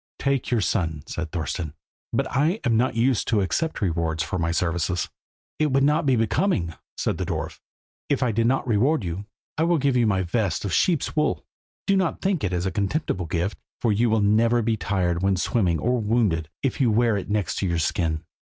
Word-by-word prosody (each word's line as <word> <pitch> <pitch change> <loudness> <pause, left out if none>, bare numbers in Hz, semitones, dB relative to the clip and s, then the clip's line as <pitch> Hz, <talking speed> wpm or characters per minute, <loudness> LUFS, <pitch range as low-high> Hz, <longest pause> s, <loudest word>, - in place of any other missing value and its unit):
"Take 140 -2 0
your 120 -3 +2
son," 80 -7 -1
said 85 0 -4
Thorston; 80 -2 -3 0.4
"but - - +1
I 160 - +1
am 120 -3 +2
not 120 +1 +1
used 120 0 +2
to 110 -3 +2
accept 160 - -1
rewards 80 -3 0
for 85 +4 -3
my 85 0 0
services." 90 +1 0 0.5
"It 155 -2 +2
would 135 +1 +3
not 150 +2 +2
be 130 - +4
becoming," 110 - +1 0.2
said - - -1
the - - 0
dwarf, - - -4 0.5
"if 140 -2 +1
I 125 - +2
did 115 +2 +1
not 135 +1 +1
reward 120 +5 +2
you. 90 +3 -4 0.3
I - - +3
will 170 0 +3
give 140 -2 +1
you 120 -2 +3
my 95 -3 +1
vest 95 0 -1
of 95 - -2
sheep's 170 -6 +1
wool. 150 - 0 0.4
Do 195 - +3
not 185 -3 0
think 190 -5 0
it 95 - 0
is 90 0 -1
a 95 - 0
contemptible 100 - -1
gift, 85 +2 -2 0.2
for 115 - +1
you 115 +3 +2
will 110 -1 +2
never 115 +3 +3
be 110 0 +1
tired 90 -4 -1
when 95 0 +2
swimming, 90 -2 +1
or 125 +6 0
wounded, 105 -8 +1
if 135 0 -1
you 125 - +4
wear 115 0 +3
it 100 - -4
next 105 -2 -1
your 85 -3 0
skin." 80 0 0
105 Hz, 205 wpm, -24 LUFS, 90-125 Hz, 0.5 s, be